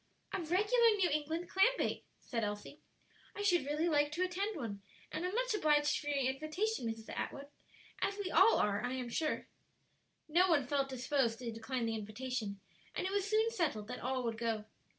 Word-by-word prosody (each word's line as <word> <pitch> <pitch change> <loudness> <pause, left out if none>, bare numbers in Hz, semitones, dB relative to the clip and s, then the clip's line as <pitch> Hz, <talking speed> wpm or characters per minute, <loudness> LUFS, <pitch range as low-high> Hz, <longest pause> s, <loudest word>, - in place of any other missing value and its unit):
"A 390 - 0
regular 415 +8 +4
New 360 -5 +2
England 315 +4 -1
clam 390 +8 +4
bake!" - - -1
said 230 -3 -3
Elsie, 205 +8 -4 0.6
"I 410 - -3
should 350 -8 +3
really 300 +3 +1
like 295 -2 +3
to 355 +3 +1
attend 390 +4 -1
one, 205 -7 -5 0.3
and 310 - -3
am 365 +3 -2
much - - +1
obliged 295 -7 +3
for 290 - -8
your 275 -3 +1
invitation, 310 - -2
Mrs. 225 0 -5
Atwood; 280 0 -4 0.5
as 400 - 0
we 395 -3 -3
all 455 - +7
are, 205 0 +1
I 250 - -1
am 255 -2 -3
sure." 310 +6 -1 0.8
No 350 +4 +4
one 290 -6 +4
felt 275 +1 0
disposed 260 -2 0
to 240 -1 -4
decline 230 +2 -3
the 225 - -1
invitation, 215 -1 -4 0.4
and - - -1
it 380 - -1
was 405 0 0
soon 440 +2 +3
settled 295 - -1
that 250 - -5
all 255 0 -1
would 230 -1 -2
go. 225 -2 -1
290 Hz, 190 wpm, -35 LUFS, 240-365 Hz, 0.8 s, all